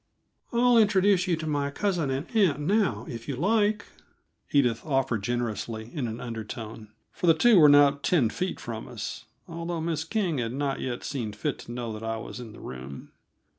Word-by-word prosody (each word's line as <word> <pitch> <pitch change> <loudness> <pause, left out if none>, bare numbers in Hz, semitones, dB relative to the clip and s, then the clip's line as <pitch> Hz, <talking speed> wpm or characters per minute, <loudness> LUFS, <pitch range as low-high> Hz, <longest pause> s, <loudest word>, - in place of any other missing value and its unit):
"I'll 240 0 +5
introduce 200 -3 +4
you 175 - +2
to 160 0 -6
my 145 -2 0
cousin 175 -2 -1
and 135 +3 -2
aunt 190 -9 +3
now, 155 - +1
if 115 -1 -7
you 140 - -2
like," 210 - +1 0.7
Edith 125 -6 +2
offered 135 -7 0
generously, 115 0 -3
in 140 -7 -2
an 110 +1 -5
undertone 110 -2 -7 0.2
for 180 - -3
the 165 - +7
two 225 +3 +6
were 150 -2 +8
not 145 0 +6
ten 135 -11 +2
feet 185 +1 -3
from 115 -3 -6
us, - - -6 0.2
although 170 0 -4
Miss 160 -1 -1
King 170 - -1
had 115 -1 -2
not 140 0 -1
yet 125 -2 -4
seen 120 -7 -3
fit 135 +6 -3
to - - -9
know 120 -2 -4
that 110 - -7
I 115 0 -2
was 110 - -7
in 120 -3 -8
the - - -13
room. 65 +2 -8
140 Hz, 190 wpm, -27 LUFS, 115-175 Hz, 0.7 s, were